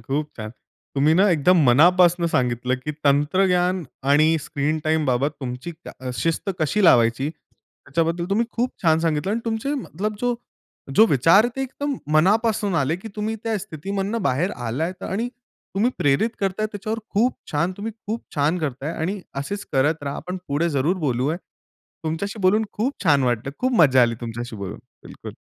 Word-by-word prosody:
खूप 145 Hz, +6 st, -3 dB
छान. 110 Hz, -1 st, -6 dB, 0.4 s
तुम्ही 145 Hz, +3 st, +3 dB
ना 195 Hz, +3 st, +5 dB
एकदम 170 Hz, +1 st, +4 dB
मनापासनं 175 Hz, +6 st, +5 dB
सांगितलं 125 Hz, -4 st, 0 dB
की 150 Hz, -, -2 dB
तंत्रग्यान 180 Hz, +5 st, +2 dB, 0.3 s
आणि 155 Hz, +2 st, +5 dB
स्क्रीन 150 Hz, +2 st, -1 dB
टाईम 155 Hz, 0 st, +1 dB
बाबत 130 Hz, +3 st, +1 dB
तुमची 125 Hz, +5 st, -5 dB, 0.2 s
क -, -, -5 dB
अ, 130 Hz, -1 st, -4 dB
शिस्त 165 Hz, +8 st, -1 dB
कशी 195 Hz, +6 st, +1 dB
लावायची? 120 Hz, -1 st, +4 dB
त्याच्याबद्दल 165 Hz, +1 st, -4 dB
तुम्ही 225 Hz, +4 st, +2 dB
खूप 245 Hz, +2 st, 0 dB
छान 160 Hz, -3 st, +4 dB
सांगितलं 160 Hz, +3 st, 0 dB
आणि 230 Hz, -, -1 dB
तुमचे, 230 Hz, +5 st, -1 dB
मतलब 210 Hz, -, -4 dB
जो 245 Hz, -1 st, +1 dB, 0.6 s
जो 220 Hz, -, +8 dB
विचार 165 Hz, -, +5 dB
ते 270 Hz, -, -1 dB
एकदम 280 Hz, +2 st, -3 dB, 0.2 s
मनापासून 205 Hz, +4 st, +2 dB
आले 145 Hz, +2 st, +1 dB
की 195 Hz, +5 st, -9 dB
तुम्ही 215 Hz, +1 st, -2 dB
त्या 225 Hz, -1 st, 0 dB
स्थितीमधनं 195 Hz, +6 st, -4 dB
बाहेर 170 Hz, +4 st, +1 dB, 0.2 s
आलायत 160 Hz, +11 st, -3 dB
आणि 225 Hz, +6 st, -2 dB
तुम्ही 240 Hz, -2 st, -4 dB
प्रेरित 145 Hz, +11 st, +2 dB
करताय, 195 Hz, +2 st, 0 dB
त्याच्यावर 215 Hz, +2 st, -4 dB
खूप 235 Hz, +5 st, +1 dB, 0.2 s
छान, 170 Hz, +5 st, +1 dB
तुम्ही 220 Hz, +3 st, -5 dB
खूप 225 Hz, +2 st, -3 dB
छान 150 Hz, +4 st, +1 dB
करताय 145 Hz, -1 st, -3 dB
आणि 185 Hz, +5 st, -3 dB, 0.2 s
असेच 200 Hz, +9 st, -4 dB
करत 145 Hz, +3 st, +1 dB
राहा. 140 Hz, 0 st, -3 dB
आपण 180 Hz, +2 st, -5 dB
पुढे 155 Hz, +5 st, +1 dB
जरूर 145 Hz, +6 st, +1 dB
बोलूया. 130 Hz, +5 st, 0 dB, 0.7 s
तुमच्याशी 195 Hz, +7 st, -3 dB
बोलून 205 Hz, +4 st, +4 dB
खूप 245 Hz, +6 st, -1 dB
छान 145 Hz, -4 st, +4 dB
वाटलं. 120 Hz, +1 st, -1 dB
खूप 255 Hz, +1 st, 0 dB
मज्जा 130 Hz, -5 st, +6 dB
आली 115 Hz, -1 st, +2 dB
तुमच्याशी 120 Hz, 0 st, -6 dB
बोलून. 100 Hz, -2 st, -6 dB, 0.3 s
बिलकुल. -, -, -9 dB
165 Hz, 165 wpm, -23 LUFS, 140-205 Hz, 0.7 s, जो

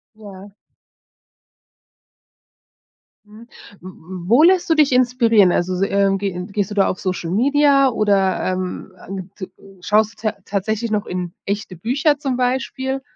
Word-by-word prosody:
Ja. 200 Hz, -2 st, -12 dB, 2.7 s
Mhm, 215 Hz, +3 st, -15 dB, 0.4 s
w 185 Hz, -, -9 dB
w 180 Hz, 0 st, -10 dB
wo 245 Hz, +7 st, +5 dB
lässt 360 Hz, +1 st, +4 dB
du -, -, +5 dB
dich 300 Hz, -4 st, +3 dB
inspirieren? 235 Hz, -6 st, +3 dB
Also, 180 Hz, +1 st, -1 dB
s 185 Hz, -, -3 dB
ähm, 195 Hz, -1 st, +2 dB
ge 200 Hz, -1 st, -3 dB
ge 180 Hz, +1 st, -6 dB
gehst 205 Hz, -1 st, -2 dB
du -, -, -5 dB
da 195 Hz, -, +2 dB
auf 185 Hz, -, -3 dB
Social-Media 270 Hz, -, +2 dB
oder, 200 Hz, -5 st, +1 dB
ähm, 185 Hz, +1 st, -5 dB, 0.2 s
äh, 195 Hz, 0 st, -5 dB
g 185 Hz, +1 st, -10 dB
t -, -, -29 dB, 0.3 s
schaust 215 Hz, +4 st, +1 dB
du -, -, -20 dB
tat 200 Hz, -2 st, -8 dB
tatsächlich 215 Hz, +3 st, -2 dB
noch 210 Hz, -1 st, -1 dB
in 180 Hz, -1 st, -5 dB
echte 200 Hz, -2 st, -4 dB
Bücher, 280 Hz, -, 0 dB
zum 270 Hz, -4 st, -2 dB
Beispiel? 265 Hz, +1 st, -2 dB
205 Hz, 155 wpm, -19 LUFS, 185-250 Hz, 2.7 s, wo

